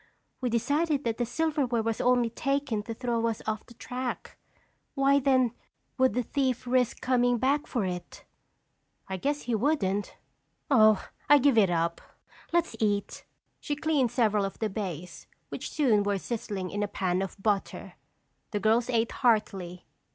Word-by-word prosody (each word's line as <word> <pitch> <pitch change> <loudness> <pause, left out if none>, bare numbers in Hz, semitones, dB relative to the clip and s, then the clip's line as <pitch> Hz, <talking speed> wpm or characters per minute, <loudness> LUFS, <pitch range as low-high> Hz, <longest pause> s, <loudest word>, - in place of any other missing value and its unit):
"We 250 - 0
decided 290 +5 +1
that 230 0 -2
the 240 - 0
silverware 270 -4 0
was 225 -1 -1
only 245 -2 +3
taken 275 -3 -1
to 230 - -4
throw 235 -1 -1
us 225 -2 -2
off 215 0 -3
the 240 - -15
track. 250 +2 -5 0.6
Why 275 0 +4
then, 260 -3 +3 0.5
would 260 -1 +3
the 250 - +1
thief 260 -2 -1
risk 250 -1 +1
coming 245 -1 +2
back 275 +5 +1
for 235 -7 -1
it?" 180 -1 -6 0.8
"I 190 - -3
guess 290 +9 -1
he 245 - -2
wouldn't. 210 -5 0 0.5
Oh, 215 -5 +5 0.2
I 290 - +9
give 280 -2 +3
it 205 -4 +5
up. 170 -1 0 0.5
Let's 340 -7 +1
eat!" 205 -2 -1 0.3
She 290 - -3
cleaned 295 -4 +1
several 215 -4 +2
of 195 - -4
the 220 -2 -2
bass, 180 -4 -6 0.2
which - - -5
soon 240 -9 +3
were 200 0 0
sizzling 205 -3 -4
in 205 - -2
a 205 - 0
pan 185 -2 -1
of 195 +1 -5
butter. 200 -1 -2 0.6
The 205 - -2
girls 225 +4 +2
ate 230 -2 +1
heartily. 195 -7 0
235 Hz, 160 wpm, -28 LUFS, 205-260 Hz, 0.8 s, I